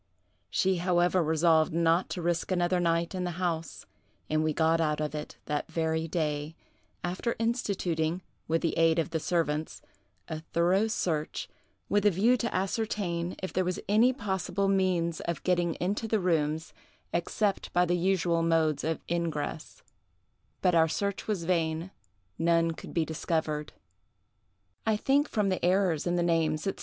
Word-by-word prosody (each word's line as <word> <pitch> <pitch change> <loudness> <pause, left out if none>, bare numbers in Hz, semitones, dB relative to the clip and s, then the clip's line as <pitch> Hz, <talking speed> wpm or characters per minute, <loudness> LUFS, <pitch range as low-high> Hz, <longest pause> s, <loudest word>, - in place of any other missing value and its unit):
She 190 -1 +1
however 175 +1 +2
resolved 160 0 +3
not 170 +2 +2
to 175 - -4
risk 170 +2 -1
another 180 0 +2
night 170 0 +1
in 185 -1 -2
the 175 -1 -3
house; 165 -3 -3 0.5
and 155 0 +2
we 155 - +1
got 165 +1 +2
out 150 -2 0
of 150 -1 -2
it 150 -1 -6
that 150 0 -3
very 160 0 0
day, 150 -2 -2 0.5
after 185 +7 -2
instituting, 185 -8 -1 0.2
with 165 +1 0
the 165 - 0
aid 165 0 +4
of 165 0 0
the 160 - 0
servants, 155 -2 -1 0.4
a 155 - -4
thorough 175 +6 +1
search, 160 -8 -2 0.4
with 205 -1 +2
a 210 - +6
view 210 +7 +3
to 235 -1 -2
ascertain 185 -3 -1
if 185 - -4
there 185 - +2
was 180 0 -2
any 220 +5 +5
possible 200 -4 -1
means 185 -4 +1
of 170 -4 -4
getting 175 -2 +1
into 200 +5 -2
the 220 -1 +1
rooms 160 -3 0 0.4
except 195 +3 -1
by 180 0 +3
the 175 0 +1
usual 175 -2 +1
modes 165 -3 +2
of 160 0 -1
ingress; 165 -2 -3 0.8
but 180 -2 +4
our 165 -1 +5
search 200 +4 -2
was 205 -6 -1
vain—none 165 - -1
could 160 - -9
be 165 -2 +2
discovered. 155 -1 -2 1.1
"I 220 -1 +1
think, 280 +6 +2
from 210 -2 +1
the 185 - -2
errors 180 -3 +2
in 175 - +1
the 175 - +1
names, 160 -2 +1
&c. 195 - 0
170 Hz, 160 wpm, -29 LUFS, 160-185 Hz, 1.1 s, a